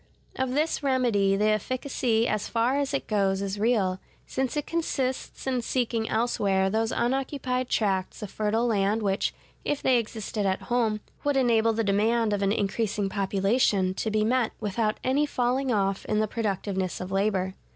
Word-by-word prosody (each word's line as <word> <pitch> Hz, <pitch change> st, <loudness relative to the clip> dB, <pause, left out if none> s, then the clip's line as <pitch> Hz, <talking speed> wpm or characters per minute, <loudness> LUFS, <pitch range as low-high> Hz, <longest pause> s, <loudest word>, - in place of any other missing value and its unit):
Of 260 Hz, -1 st, -1 dB
this 310 Hz, +2 st, +1 dB
remedy 240 Hz, -8 st, +2 dB
the 210 Hz, +2 st, +2 dB
efficacy 235 Hz, +1 st, 0 dB
as 215 Hz, -1 st, -1 dB
far 235 Hz, +3 st, +1 dB
as 280 Hz, -1 st, -1 dB
it 275 Hz, -, -2 dB
goes 195 Hz, -3 st, +1 dB
is 200 Hz, +1 st, -3 dB
real, 205 Hz, -5 st, +1 dB, 0.3 s
since 265 Hz, +2 st, -2 dB
it 295 Hz, -, -1 dB
consists 270 Hz, -6 st, -2 dB
in 255 Hz, -2 st, 0 dB
seeking 230 Hz, -2 st, -1 dB
elsewhere 195 Hz, -5 st, +1 dB
those 225 Hz, +1 st, 0 dB
unoccupied 255 Hz, 0 st, -1 dB
tracts 195 Hz, 0 st, 0 dB
of 205 Hz, -, -6 dB
fertile 215 Hz, +2 st, 0 dB
land 210 Hz, -1 st, +1 dB
which, 195 Hz, -1 st, +1 dB, 0.3 s
if 290 Hz, -, -1 dB
they 255 Hz, -2 st, +4 dB
existed 215 Hz, -2 st, -4 dB
at 190 Hz, 0 st, -1 dB
home, 225 Hz, -4 st, 0 dB, 0.2 s
would 285 Hz, -1 st, +1 dB
enable 230 Hz, -3 st, +3 dB
the 225 Hz, +1 st, 0 dB
demand 215 Hz, +2 st, +2 dB
of 200 Hz, -, -1 dB
an 195 Hz, 0 st, +2 dB
increasing 205 Hz, -1 st, -1 dB
population 195 Hz, 0 st, +1 dB
to 220 Hz, -, -2 dB
be 215 Hz, 0 st, +1 dB
met 245 Hz, 0 st, +1 dB
without 215 Hz, +1 st, -1 dB
any 280 Hz, +4 st, +2 dB
falling 255 Hz, 0 st, 0 dB
off 195 Hz, -3 st, 0 dB
in 215 Hz, -, 0 dB
the 215 Hz, 0 st, +2 dB
productiveness 195 Hz, -4 st, -2 dB
of 185 Hz, +1 st, -6 dB
labor. 195 Hz, -1 st, 0 dB
220 Hz, 170 wpm, -27 LUFS, 200-250 Hz, 0.3 s, they